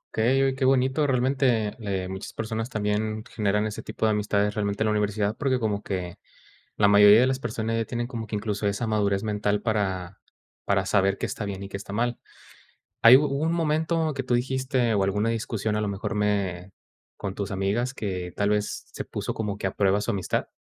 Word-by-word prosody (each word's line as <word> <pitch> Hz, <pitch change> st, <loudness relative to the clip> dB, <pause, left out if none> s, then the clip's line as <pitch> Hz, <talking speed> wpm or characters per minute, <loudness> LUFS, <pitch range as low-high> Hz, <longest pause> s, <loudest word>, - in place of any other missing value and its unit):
Okey, 130 Hz, +5 st, +3 dB
oye, 135 Hz, -1 st, +2 dB
qué 135 Hz, 0 st, -4 dB
bonito, 135 Hz, +3 st, +3 dB
realmente, 125 Hz, -4 st, +1 dB
eh, 95 Hz, -4 st, -3 dB
muchas 95 Hz, +1 st, -7 dB
personas 110 Hz, +2 st, -3 dB
también 110 Hz, 0 st, -1 dB
generan 105 Hz, -2 st, 0 dB
ese 105 Hz, -1 st, -4 dB
tipo 110 Hz, +1 st, -3 dB
de 110 Hz, -, +3 dB
amistades 105 Hz, 0 st, +1 dB
realmente 100 Hz, 0 st, -1 dB
en -, -, 0 dB
la 110 Hz, -, +2 dB
universidad 105 Hz, 0 st, 0 dB
porque 135 Hz, -3 st, 0 dB
como 105 Hz, -2 st, -1 dB
que 90 Hz, -3 st, -5 dB, 0.6 s
la 100 Hz, -, +5 dB
mayoría 105 Hz, +2 st, +8 dB
de -, -, +5 dB
las 130 Hz, 0 st, 0 dB
personas 115 Hz, -2 st, -2 dB
ya 115 Hz, -, 0 dB
tienen 120 Hz, -1 st, -3 dB
como 115 Hz, -3 st, -6 dB
que 105 Hz, -, -4 dB
incluso 105 Hz, -1 st, -2 dB
esa 100 Hz, +4 st, -1 dB
madurez 100 Hz, -2 st, +1 dB
mental 105 Hz, -1 st, -1 dB
para 95 Hz, -5 st, -2 dB, 0.5 s
para 95 Hz, -1 st, +1 dB
saber 100 Hz, -1 st, +2 dB
qué -, -, -2 dB
está 105 Hz, -, -4 dB
bien 100 Hz, -1 st, -5 dB
y -, -, -6 dB
qué 100 Hz, -, -5 dB
está 100 Hz, 0 st, -8 dB
mal. 120 Hz, +2 st, -1 dB, 0.8 s
¿Hay 120 Hz, +3 st, +10 dB
hubo 150 Hz, -, +1 dB
un 150 Hz, +4 st, 0 dB
momento 160 Hz, -1 st, 0 dB
que 135 Hz, -1 st, -3 dB
tú 125 Hz, -, -1 dB
dijiste 130 Hz, -1 st, +1 dB
o 100 Hz, -, +2 dB
alguna 105 Hz, +3 st, 0 dB
discusión, 110 Hz, -2 st, -1 dB
a 105 Hz, -, 0 dB
lo 105 Hz, -, -1 dB
mejor 105 Hz, +2 st, -3 dB
me 100 Hz, -3 st, -1 dB, 0.5 s
con 100 Hz, -1 st, -5 dB
tus 100 Hz, -1 st, -4 dB
amigas, 100 Hz, +7 st, -1 dB
que 90 Hz, -6 st, -4 dB
tal 100 Hz, -, 0 dB
vez 105 Hz, 0 st, -1 dB
se -, -, -4 dB
puso -, -, -4 dB
como 105 Hz, -2 st, -3 dB
que 95 Hz, -, -2 dB
a 95 Hz, -, -4 dB
prueba 100 Hz, 0 st, +3 dB
su 105 Hz, +3 st, -1 dB
amistad? 100 Hz, -4 st, -1 dB
105 Hz, 210 wpm, -26 LUFS, 100-120 Hz, 0.8 s, Hay